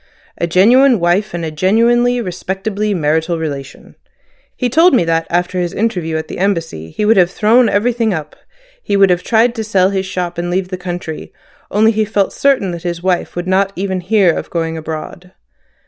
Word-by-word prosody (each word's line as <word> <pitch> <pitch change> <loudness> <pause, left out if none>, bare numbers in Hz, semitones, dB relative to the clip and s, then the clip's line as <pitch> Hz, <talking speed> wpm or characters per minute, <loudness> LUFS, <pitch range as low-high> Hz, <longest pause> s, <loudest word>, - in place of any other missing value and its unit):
"A 170 - 0
genuine 235 +8 +4
wife 175 +5 +1
and 170 -1 -4
a 160 - -4
genuinely, 235 +8 +2
respectably, 195 +2 -3
marital 160 +1 0
relation. 140 -4 -7 0.6
He 250 - 0
told 325 +6 +4
me 205 - +2
that 165 0 0
after 180 +1 -1
his 175 -1 -2
interview 180 -8 -1
at 160 - -5
the - - -7
Embassy 165 - -2
he 210 - -3
would 220 0 +4
have 180 -2 +4
thrown 225 +4 +3
everything 230 +2 +1
up, 155 -4 -5 0.5
would 195 -2 +4
have 180 0 +1
tried 230 +4 +2
to 225 -2 -4
sell 195 -3 +2
his 190 -1 -2
shop, 175 -2 -4
and 175 0 -3
leave 185 +1 -1
the 185 - -3
country, 175 -3 -6 0.4
only 220 +2 +3
he 220 0 0
felt 205 -2 -1
certain 270 -9 +1
that 170 -1 -6
his 170 0 -4
wife 185 -2 -1
would 175 0 -3
not 195 +1 +1
even 190 0 -2
hear 185 -2 +2
of - - -5
going 165 -1 -2
abroad. 160 +3 -7
185 Hz, 190 wpm, -15 LUFS, 170-215 Hz, 0.6 s, genuine